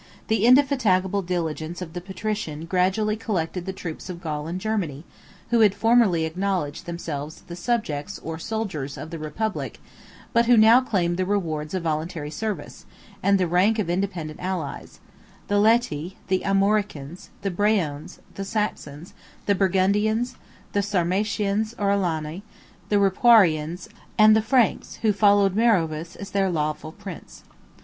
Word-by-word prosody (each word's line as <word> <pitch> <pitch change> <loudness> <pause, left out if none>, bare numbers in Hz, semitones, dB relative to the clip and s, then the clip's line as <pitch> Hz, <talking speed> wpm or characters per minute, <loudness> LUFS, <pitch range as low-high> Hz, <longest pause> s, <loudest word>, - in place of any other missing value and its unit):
The 220 0 +3
indefatigable 230 -8 +3
diligence 170 -2 -3
of 170 -3 -7
the 175 - -5
patrician 190 -4 -4
gradually 190 +4 +1
collected 185 -5 -3
the - - -1
troops 175 -1 -7
of 175 -2 -6
Gaul 155 -3 -4
and 175 +3 -4
Germany, 185 -9 -2 0.5
who 235 - +4
had 210 -3 +5
formerly 225 -9 +3
acknowledged 180 -2 -2
themselves 160 -2 -5
the 170 - -8
subjects, 195 -4 -2
or 160 0 -5
soldiers, 185 -10 -4
of 155 - -8
the 165 - -5
republic, 180 +9 -4 0.5
but 235 -1 +3
who 245 -1 +6
now 225 +3 +7
claimed 175 -8 0
the 185 - 0
rewards 165 -5 -2
of 185 - -2
voluntary 155 -1 -3
service, 215 +6 -5 0.3
and 200 0 +4
the 185 - +2
rank 185 +6 +3
of 195 -6 -1
independent 175 -4 -3
allies; 180 -6 -5 0.5
the 205 - +2
Læti, 200 -6 +2
the 185 0 +2
Armoricans, 195 -6 0
the 195 - -1
Breones, 180 -7 0 0.2
the 195 - -5
Saxons, 185 -7 -4 0.3
the 200 - +3
Burgundians, 205 +5 +1 0.4
the 205 - +2
Sarmatians, 205 +3 0
or 200 -1 +1
Alani, 170 -3 -1 0.5
the 210 - +2
Ripuarians, 185 -5 +4 0.3
and 215 0 +7
the 220 - +4
Franks 245 +1 +1
who 215 -2 +4
followed 200 -1 +4
Meroveus 170 -8 +1
as 200 0 -8
their 195 -1 +1
lawful 155 -1 -2
prince. 190 -1 -10
190 Hz, 145 wpm, -24 LUFS, 165-210 Hz, 0.5 s, now